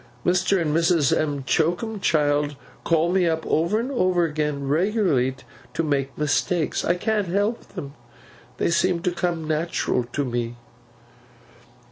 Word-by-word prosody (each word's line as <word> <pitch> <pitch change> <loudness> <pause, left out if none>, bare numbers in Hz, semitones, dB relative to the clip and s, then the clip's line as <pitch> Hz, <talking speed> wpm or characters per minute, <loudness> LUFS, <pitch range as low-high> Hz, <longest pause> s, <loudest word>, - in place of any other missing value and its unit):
Mr. 185 +2 +2
and 155 -3 0
Mrs. 165 -4 +3
M'Choakumchild 150 - 0 0.3
call 165 +1 +2
me 185 -2 +3
up, 160 -1 -1
over 170 +7 +1
and 250 +4 -3
over 185 -8 +2
again, 150 -3 -2
regularly 160 - +1 0.4
to 165 - 0
make 140 -3 -1
mistakes. 150 +2 0
I 175 - +2
can't 210 +1 0
help 205 +6 0
them. 140 0 -6 0.6
They - - +1
seem 175 0 +1
to 180 - +1
come 170 -2 -2
natural 155 -5 0
to 140 +4 -3
me. 120 -1 -3
165 Hz, 130 wpm, -23 LUFS, 145-180 Hz, 0.6 s, Mrs